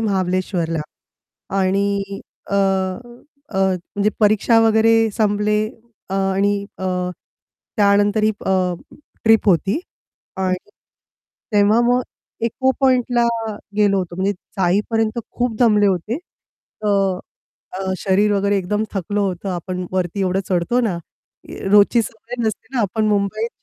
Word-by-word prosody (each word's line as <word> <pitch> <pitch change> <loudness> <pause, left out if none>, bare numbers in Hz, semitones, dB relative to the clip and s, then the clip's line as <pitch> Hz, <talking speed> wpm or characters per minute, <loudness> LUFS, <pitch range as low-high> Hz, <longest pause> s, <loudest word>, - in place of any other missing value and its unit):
महाबळेश्वरला 185 -5 -1 0.8
आणि 200 +1 0 0.3
अ, - - 0
अ, 200 +6 -2
म्हणजे 190 +2 0
परीक्षा 215 +2 +4
वगैरे 225 0 +4
संपले 210 0 +2 0.5
अ, - - -2
आणि 195 +1 +1
अ, 190 - -5 0.9
त्यानंतरही 205 +1 +3
अ, - - +1 0.7
ट्रिप 225 -1 +4
होती 190 - +2 0.6
आणि 185 -1 0 1.0
तेव्हा 205 +2 +4
मग 245 +1 +3 0.4
इको 260 +3 +1
पॉइंटला 245 -2 +3 0.5
गेलो 205 -2 +3
होतो 180 -2 -4
म्हणजे 190 +2 +1
जाईपर्यंत 210 +5 -1
खूप 245 -2 -1
दमले 210 -4 +5
होते. 195 +5 0 0.7
तर 195 -3 +1 0.6
अ, 190 -1 -2
शरीर 205 +2 +2
वगैरे 200 0 +1
एकदम 210 +3 -1
थकलं 205 +1 -2
होतं. 195 -1 -2
आपण 180 +1 -4
वरती 185 +1 -1
एवढं 190 0 +1
चढतो 185 +7 +1
ना, 215 -8 0 0.8
रोजची 210 +3 +6
सवय 225 +3 -8
नसते 220 0 -3
ना, 250 - +1
आपण 215 +1 0
मुंबईत 210 +2 0
205 Hz, 115 wpm, -20 LUFS, 190-220 Hz, 1.0 s, रोजची